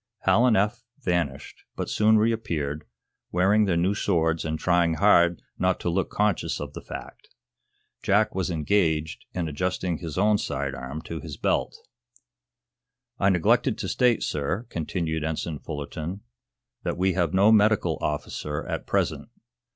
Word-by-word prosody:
Hal 120 Hz, +3 st, +4 dB
and 115 Hz, -, +4 dB
Eph 105 Hz, +4 st, +1 dB, 0.2 s
vanished, 85 Hz, -, -2 dB
but -, -, -3 dB
soon 110 Hz, +1 st, +4 dB
reappeared, 95 Hz, -10 st, -1 dB, 0.5 s
wearing 100 Hz, +4 st, +3 dB
their 90 Hz, -4 st, +1 dB
new 90 Hz, +4 st, +2 dB
swords 80 Hz, -5 st, +1 dB
and 80 Hz, -1 st, -2 dB
trying 85 Hz, -1 st, +2 dB
hard 85 Hz, -3 st, +4 dB, 0.2 s
not 90 Hz, 0 st, +1 dB
to 85 Hz, -, 0 dB
look 95 Hz, 0 st, 0 dB
conscious 105 Hz, -3 st, 0 dB
of -, -, -6 dB
the -, -, -7 dB
fact. -, -, -10 dB, 0.7 s
Jack 105 Hz, +2 st, +2 dB
was 95 Hz, -1 st, -1 dB
engaged 80 Hz, -2 st, 0 dB
in 85 Hz, -2 st, -1 dB
adjusting 90 Hz, +2 st, -2 dB
his 80 Hz, -3 st, -6 dB
own 105 Hz, +2 st, +3 dB
side 70 Hz, -, -3 dB
arm 65 Hz, +5 st, -6 dB
to 80 Hz, -, -6 dB
his -, -, -8 dB
belt. -, -, 0 dB, 1.4 s
"I 95 Hz, -, +4 dB
neglected 90 Hz, -4 st, +2 dB
to -, -, -4 dB
state, 125 Hz, -3 st, +2 dB
sir," 80 Hz, -, -2 dB
continued 80 Hz, -1 st, -2 dB
Ensign 80 Hz, -1 st, -3 dB
Fullerton, 80 Hz, +6 st, -6 dB, 0.6 s
"that 85 Hz, -, -3 dB
we 95 Hz, +1 st, +2 dB
have 85 Hz, -3 st, +1 dB
no 100 Hz, +3 st, +6 dB
medical 110 Hz, -1 st, +3 dB
officer 75 Hz, 0 st, -3 dB
at -, -, -4 dB
present. -, -, -1 dB
90 Hz, 150 wpm, -26 LUFS, 80-100 Hz, 1.4 s, no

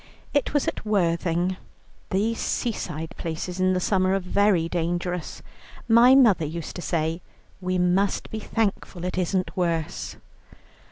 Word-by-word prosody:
It 285 Hz, -2 st, +1 dB
was 290 Hz, -2 st, +1 dB
at -, -, -3 dB
Worthing; 180 Hz, -3 st, +1 dB, 0.5 s
those 220 Hz, +4 st, 0 dB
seaside 165 Hz, -8 st, -3 dB
places 170 Hz, +2 st, -4 dB
in 185 Hz, 0 st, +3 dB
the 185 Hz, -, +1 dB
summer 185 Hz, 0 st, +2 dB
are -, -, +1 dB
very 185 Hz, -2 st, +2 dB
dangerous. 175 Hz, 0 st, -3 dB, 0.4 s
My 240 Hz, +3 st, +7 dB
mother 220 Hz, -11 st, +5 dB
used 160 Hz, +2 st, -5 dB
to -, -, -5 dB
say: 165 Hz, 0 st, -1 dB, 0.4 s
'We 185 Hz, 0 st, -1 dB
must 180 Hz, +3 st, +1 dB
be 220 Hz, -, -3 dB
thankful 200 Hz, -5 st, -2 dB
it 180 Hz, 0 st, -2 dB
isn't 185 Hz, +1 st, -1 dB
worse.' 160 Hz, -, -2 dB
180 Hz, 135 wpm, -25 LUFS, 170-200 Hz, 0.5 s, My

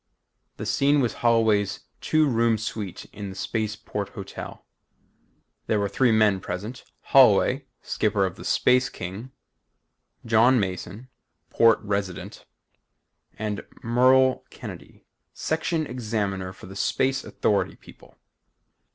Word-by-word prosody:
The -, -, -5 dB
scene 140 Hz, +8 st, +3 dB
was 120 Hz, -4 st, +1 dB
Holloway's 110 Hz, -4 st, +2 dB, 0.2 s
two 155 Hz, -1 st, +2 dB
room 115 Hz, -3 st, +2 dB
suite 105 Hz, -3 st, -5 dB
in 100 Hz, -1 st, -6 dB
the 95 Hz, -, -9 dB
Space 110 Hz, +2 st, -2 dB
Port 105 Hz, -2 st, -5 dB
Hotel. 100 Hz, -1 st, -9 dB, 1.0 s
There 110 Hz, -, +1 dB
were 100 Hz, -, 0 dB
three 120 Hz, +5 st, +2 dB
men 105 Hz, -3 st, +3 dB
present 100 Hz, +8 st, -6 dB, 0.2 s
Holloway, 130 Hz, +2 st, +4 dB, 0.2 s
skipper 105 Hz, -2 st, +1 dB
of 95 Hz, -, -4 dB
the -, -, -11 dB
Space 125 Hz, 0 st, +3 dB
King, 95 Hz, +7 st, -7 dB, 1.0 s
John 120 Hz, +3 st, +4 dB
Mason, 100 Hz, +5 st, -4 dB, 0.4 s
Port 115 Hz, -1 st, +5 dB
Resident, 100 Hz, -3 st, -4 dB, 0.9 s
and 105 Hz, -1 st, -3 dB, 0.2 s
Merle 130 Hz, +2 st, +4 dB
Kennedy, -, -, -11 dB, 0.3 s
Section 160 Hz, 0 st, -1 dB
Examiner 105 Hz, -7 st, -3 dB
for 95 Hz, -, -13 dB
the 95 Hz, +1 st, -10 dB
Space 135 Hz, +6 st, 0 dB
Authority 100 Hz, -2 st, 0 dB
people. -, -, -18 dB
110 Hz, 115 wpm, -25 LUFS, 100-125 Hz, 1.0 s, Port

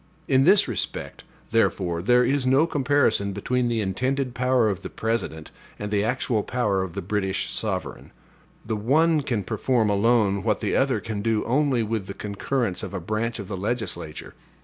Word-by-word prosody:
In 135 Hz, 0 st, +4 dB
this 195 Hz, +3 st, +5 dB
respect, 120 Hz, -6 st, -4 dB, 0.3 s
therefore, 90 Hz, -6 st, +1 dB
there 125 Hz, +6 st, +4 dB
is 135 Hz, 0 st, +1 dB
no 135 Hz, +5 st, +4 dB
comparison 140 Hz, -9 st, +1 dB
between 125 Hz, +5 st, 0 dB
the 115 Hz, -2 st, 0 dB
intended 125 Hz, +6 st, -1 dB
power 125 Hz, -2 st, +2 dB
of 100 Hz, -2 st, -2 dB
the -, -, -6 dB
President 95 Hz, -9 st, -3 dB, 0.3 s
and 105 Hz, 0 st, -5 dB
the 105 Hz, -1 st, +2 dB
actual 120 Hz, -1 st, 0 dB
power 105 Hz, -5 st, 0 dB
of 95 Hz, -3 st, -5 dB
the 100 Hz, -, -4 dB
British 95 Hz, 0 st, -1 dB
sovereign. -, -, -4 dB, 0.5 s
The 110 Hz, -, -2 dB
one 150 Hz, +9 st, +3 dB
can 120 Hz, -7 st, -2 dB
perform 110 Hz, +1 st, +1 dB
alone 100 Hz, -1 st, +2 dB
what 105 Hz, 0 st, 0 dB
the -, -, -1 dB
other 135 Hz, -1 st, +2 dB
can 110 Hz, -3 st, -4 dB
do 110 Hz, 0 st, +1 dB
only 130 Hz, -1 st, +1 dB
with 110 Hz, -3 st, -3 dB
the 100 Hz, -, -6 dB
concurrence 105 Hz, +1 st, -2 dB
of -, -, -6 dB
a -, -, -2 dB
branch 110 Hz, +6 st, -2 dB
of 100 Hz, -4 st, -7 dB
the 100 Hz, -, -4 dB
legislature. 100 Hz, -6 st, -3 dB
115 Hz, 175 wpm, -24 LUFS, 100-125 Hz, 0.5 s, this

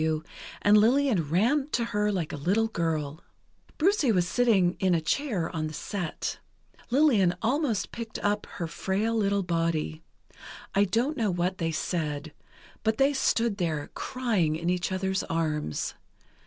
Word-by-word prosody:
W., 160 Hz, 0 st, 0 dB, 0.4 s
and 210 Hz, +1 st, +6 dB
Lillian 230 Hz, -, +3 dB
ran 245 Hz, -, +2 dB
to 235 Hz, -, +1 dB
her 210 Hz, -2 st, 0 dB
like 180 Hz, -6 st, -2 dB
a -, -, -2 dB
little 190 Hz, +10 st, +1 dB
girl. 160 Hz, -5 st, -2 dB, 0.6 s
Brucie 320 Hz, -, +3 dB
was 180 Hz, -4 st, +2 dB
sitting 195 Hz, -7 st, +3 dB
in 185 Hz, -2 st, +3 dB
a -, -, +2 dB
chair 180 Hz, -, -1 dB
on 155 Hz, -1 st, -1 dB
the 155 Hz, -, -7 dB
set. 180 Hz, 0 st, -4 dB, 0.5 s
Lillian 235 Hz, -, +4 dB
almost 250 Hz, -2 st, 0 dB
picked 230 Hz, -2 st, -6 dB
up 205 Hz, 0 st, 0 dB
her 170 Hz, -, -2 dB
frail 195 Hz, +7 st, -1 dB
little 200 Hz, -2 st, +1 dB
body. 165 Hz, -2 st, -1 dB, 0.7 s
I 200 Hz, 0 st, +4 dB
don't 245 Hz, +10 st, 0 dB
know 225 Hz, -4 st, +1 dB
what 180 Hz, +2 st, -1 dB
they 165 Hz, -1 st, 0 dB
said, 155 Hz, -2 st, -3 dB, 0.5 s
but 220 Hz, 0 st, +1 dB
they 275 Hz, +2 st, +4 dB
stood 235 Hz, -5 st, +1 dB
there, 160 Hz, -6 st, -2 dB
crying 220 Hz, -12 st, 0 dB
in 170 Hz, +2 st, -1 dB
each 180 Hz, +1 st, -1 dB
other's 190 Hz, 0 st, 0 dB
arms. 155 Hz, -, -2 dB
190 Hz, 155 wpm, -27 LUFS, 165-230 Hz, 0.7 s, and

